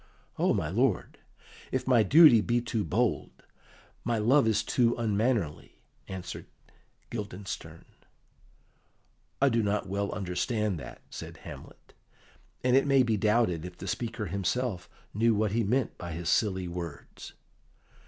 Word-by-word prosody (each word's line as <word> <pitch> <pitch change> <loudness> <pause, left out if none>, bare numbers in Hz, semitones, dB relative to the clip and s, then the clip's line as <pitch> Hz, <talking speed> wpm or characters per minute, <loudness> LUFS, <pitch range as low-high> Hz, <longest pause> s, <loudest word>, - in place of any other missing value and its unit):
"O - - +3
my - - 0
lord, - - 0 0.5
if - - -1
my 125 -3 +5
duty 130 - +7
be 120 +3 +1
too 115 -2 -2
bold, 115 +4 -1 0.6
my 120 -1 0
love 120 +4 +4
is 110 - +2
too 120 -2 +2
unmannerly," 110 -6 -1 0.2
answered 95 -2 -7 0.6
Guildenstern. 95 -6 -6 1.5
"I 140 - +4
do 115 -2 +2
not 105 -1 -1
well 100 +1 -2
understand 100 +1 -1
that," 65 -3 -10
said - - -8
Hamlet; - - -12 0.7
and 125 0 +3
it 135 +2 +4
may 135 -2 +5
be 115 -3 +1
doubted 105 -5 +1
if 90 0 -8
the - - -8
speaker 115 -2 -3
himself 100 +2 -2 0.2
knew 115 +2 +3
what 105 -1 +1
he 115 +2 +1
meant 125 +6 0
by 85 -2 -6
his 85 +1 -3
silly 95 -4 +1
words. 85 -3 -8
105 Hz, 135 wpm, -29 LUFS, 95-120 Hz, 1.5 s, duty